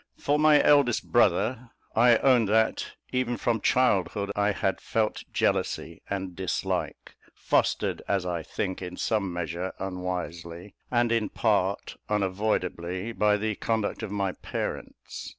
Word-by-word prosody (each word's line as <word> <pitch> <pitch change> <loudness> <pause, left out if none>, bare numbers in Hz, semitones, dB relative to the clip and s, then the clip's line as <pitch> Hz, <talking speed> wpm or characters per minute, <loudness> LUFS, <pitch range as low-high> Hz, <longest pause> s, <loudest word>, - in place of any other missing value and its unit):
For 145 +1 +1
my 155 -1 +6
eldest 140 -5 +3
brother, 120 +3 +2 0.3
I 120 0 +6
own 125 -3 +4
that, 110 +2 +1 0.2
even 125 -1 0
from 115 -3 0
childhood, 100 -5 +2
I 105 0 +2
had 95 -1 -1
felt 110 -1 -1
a - - -16
jealousy 85 0 -1
and 95 -2 -3
dislike, 95 -1 -3 0.2
fostered, - - 0
as 95 -2 0
I 85 -2 -2
think, 95 +1 -4
in 90 -1 -6
some 105 -4 0
measure 85 +1 -3
unwisely, 90 -1 -5 0.2
and 120 -1 +2
in 115 -2 +1
part 100 -3 0
unavoidably, 95 -1 -1
by 105 -2 +2
the 110 +1 -1
conduct 110 -1 -1
of 110 - -4
my 100 -2 -1
parents. - - -6
105 Hz, 135 wpm, -27 LUFS, 90-115 Hz, 0.3 s, my